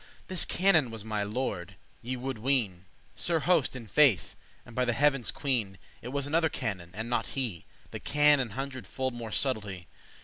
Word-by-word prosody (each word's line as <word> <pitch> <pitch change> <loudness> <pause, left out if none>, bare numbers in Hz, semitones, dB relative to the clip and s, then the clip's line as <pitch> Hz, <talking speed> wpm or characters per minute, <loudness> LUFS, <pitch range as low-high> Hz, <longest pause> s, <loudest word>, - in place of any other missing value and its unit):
*knowledge - - -24
This 185 -2 +3
canon 175 -8 +3
was 110 -2 -8
my 110 -1 -1
lord, 100 -4 -3 0.3
ye 125 +2 -4
woulde 130 -1 -4
ween;* 125 -4 +3
*imagine 90 +1 -21 0.3
Sir 170 -2 +1
Host, 170 -7 +2
in 125 -3 -7
faith, 125 - +3 0.3
and 120 - -13
by 125 - +2
the 120 -1 +1
heaven's 135 0 +2
queen, 115 -9 -1 0.2
It - - -7
was 140 +2 -1
another 160 +2 +2
canon, 100 - -4
and 110 +2 -4
not 120 0 0
he, 115 -11 -1 0.3
That - - -7
can* 150 -1 +4
an 125 -3 -1
hundred 135 -1 -5
fold 130 -1 -2
more 115 -2 -6
subtlety. 100 - -1
125 Hz, 195 wpm, -29 LUFS, 110-140 Hz, 0.3 s, can